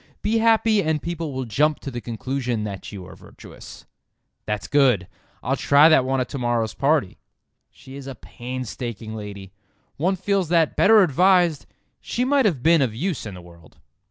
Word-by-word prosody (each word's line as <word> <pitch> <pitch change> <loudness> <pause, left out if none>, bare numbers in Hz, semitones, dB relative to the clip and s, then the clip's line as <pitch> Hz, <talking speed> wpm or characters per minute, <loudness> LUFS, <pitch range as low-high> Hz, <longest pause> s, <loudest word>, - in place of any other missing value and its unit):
Be 225 +2 +1
happy 225 -2 +3
and 155 -2 0
people 165 -1 -5
will 130 -1 -4
jump 150 +7 +1
to 135 - -6
the 120 -1 -6
conclusion 120 0 -3
that 100 -2 -7
you 95 -3 -9
are - - -12
virtuous. - - -14 0.6
"That's 105 -1 -3
good, 130 -10 +2 0.4
I'll 135 +3 0
try 145 +3 +5
that 145 -5 +4
one 135 0 0
at 125 - -1
to 140 - -5
morrow's 120 -3 -1
party." 140 -8 0 0.5
She 130 - -14
is 140 -1 -9
a 135 - -7
painstaking 120 -2 -7
lady. 100 -3 -9 0.4
One 185 +6 +1
feels 190 -2 -1
that, 165 -3 +2
better 215 -1 +6
advised, 175 0 +2 0.3
she 245 - -2
might 275 -1 +2
have 155 - 0
been 165 -1 +4
of 120 -5 -1
use 160 - -3
in 100 - -8
the 90 - -11
world. 85 -2 -18
135 Hz, 180 wpm, -22 LUFS, 115-170 Hz, 0.6 s, better